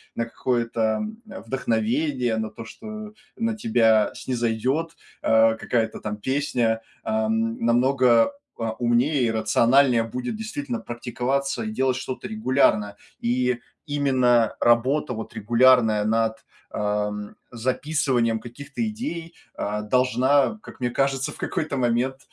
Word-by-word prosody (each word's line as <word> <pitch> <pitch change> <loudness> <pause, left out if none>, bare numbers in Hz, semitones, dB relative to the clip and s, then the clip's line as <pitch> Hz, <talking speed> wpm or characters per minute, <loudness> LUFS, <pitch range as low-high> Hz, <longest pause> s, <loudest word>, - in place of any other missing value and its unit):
на 115 - -1
какое-то, 115 -1 -2 0.2
м, 215 +1 -5
вдохновение, 125 - -1
на 110 -1 -2
то, 115 +1 -10
что 215 - -9 0.2
на 230 -1 -1
тебя 115 - +3
снизойдет, 125 +6 -1 0.3
а, 110 0 +4
какая-то 115 -2 -1
там 105 0 -4
песня, 120 -2 0 0.2
ам, 110 +1 0
намного, 125 - +4 0.3
а, 115 -1 -2
умнее 125 +3 +2
и 115 - +1
рациональнее 115 +3 +3
будет 125 - -4
действительно 240 +3 -4
практиковаться 125 - -2
и 220 - -3
делать 130 -9 0
что-то 130 +6 -5
регулярно. 130 - +1 0.2
И 125 +1 0 0.3
именно 130 -6 +2
работа, 125 +4 +2
вот 110 -1 -7
регулярная 115 -1 +4
над, 110 +1 0 0.3
а, 105 0 -1
м, 105 0 -7 0.2
записыванием 125 -1 0
каких-то 140 - -5
идей, 175 - -5 0.2
а, 105 +1 -2
должна, 130 +4 +3
а, 220 - -2
как - - -12
мне 125 -1 0
кажется, 135 +1 0
в - - -12
какой-то 155 -3 -2
момент, 125 +1 +1
125 Hz, 125 wpm, -24 LUFS, 115-140 Hz, 0.3 s, а